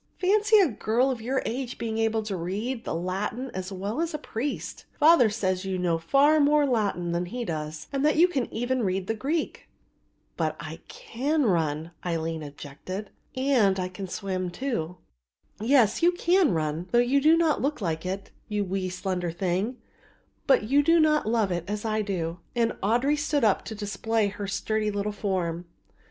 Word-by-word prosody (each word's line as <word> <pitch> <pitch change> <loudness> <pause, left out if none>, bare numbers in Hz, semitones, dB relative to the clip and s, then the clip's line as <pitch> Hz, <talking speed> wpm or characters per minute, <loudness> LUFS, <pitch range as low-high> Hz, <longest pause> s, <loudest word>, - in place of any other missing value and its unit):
Fancy 415 +3 +4
a 390 -4 +6
girl 240 +2 +1
of 245 -3 -4
your 260 +3 -1
age 250 +1 -3
being 225 -1 -3
able 225 0 +1
to 210 -2 -3
read 210 +8 -3
the - - -2
Latin 205 +9 -3
as 185 +1 -5
well 200 - -3
as 335 -2 -2
a - - -1
priest. 280 -1 -5
Father 305 -6 +6
says 185 -4 -1
that 195 - -5
you 190 - -1
know 175 -2 0
far 285 - +4
more 295 0 +4
Latin 205 -9 0
than 170 +1 -1
he 240 +5 -4
does 155 -2 -4
and 275 0 0
that 300 - +3
you 335 +3 +6
can 275 -9 -2
even 245 +2 -1
read 190 -2 -1
the 225 - -1
Greek." 290 +9 -3 0.7
"But - - -1
I - - -7
can 305 - -1
run," 160 -4 0
Aline 165 -2 -2
objected, 150 +7 -7 0.3
"and 245 -8 +3
I 180 0 -2
can 190 +1 -7
swim, 185 -1 -3
too." 180 -6 -3 0.6
"Yes, 230 -1 +3
you 345 +1 +5
can 355 - +3
run, 160 +1 -2
though 240 - +3
you 250 +4 +3
do 315 +3 +5
not 325 -3 +2
look 290 +3 -1
like 165 -5 -2
it, 190 +2 -5 0.2
you 210 -1 -1
wee 185 0 -2
slender 180 -1 -2
thing, 190 +7 -1 0.7
but 265 -5 +5
you 275 +7 +3
do 330 +3 +4
not 305 -5 +3
love 220 -4 +1
it 175 -1 -1
as 210 +2 -4
I 215 0 0
do;" 175 -4 -3 0.2
and 230 -1 +2
Audry 245 +8 +2
stood 295 -3 0
up 210 -3 +3
to 220 - -6
display 210 +1 -1
her 205 0 -6
sturdy 215 +2 -1
little 205 0 -2
form. 180 -4 -2
215 Hz, 185 wpm, -26 LUFS, 185-270 Hz, 0.7 s, a